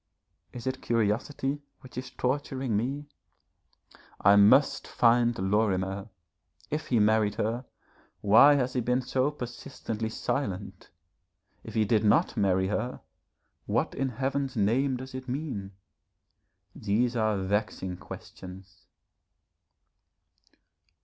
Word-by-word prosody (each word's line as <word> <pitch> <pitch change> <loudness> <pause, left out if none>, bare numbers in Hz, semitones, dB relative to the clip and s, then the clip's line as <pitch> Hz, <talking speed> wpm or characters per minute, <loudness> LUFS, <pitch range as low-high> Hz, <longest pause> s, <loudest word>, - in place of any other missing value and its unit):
Is 120 -2 -9
it 130 0 -3
curiosity 120 +6 -1 0.2
which 130 -3 -14
is 125 +1 -5
torturing 130 -2 -2
me? 135 +7 -2 1.1
I 100 +1 +6
must 105 +8 +5
find 120 0 +3
Lorimer. 95 0 0 0.6
If 155 +1 -2
he 120 - +2
married 105 -1 +3
her, 115 +4 -2 0.6
why 110 +8 +7
has 125 -2 0
he 125 - 0
been 125 +2 0
so 130 +3 +1
persistently 120 -4 -5
silent? 100 -6 -4 0.7
If - - -9
he 110 -1 +3
did 110 0 +2
not 105 - +3
marry 95 -3 +2
her, 120 +4 -3 0.7
what - - 0
in 135 0 -1
Heaven's 135 +2 -2
name 125 +6 +1
does 130 +1 -9
it 130 0 -7
mean? 125 -8 -4 1.0
These 115 +4 0
are 110 -2 +1
vexing 95 -2 -2
questions. 95 +2 -11
115 Hz, 110 wpm, -28 LUFS, 105-130 Hz, 1.1 s, why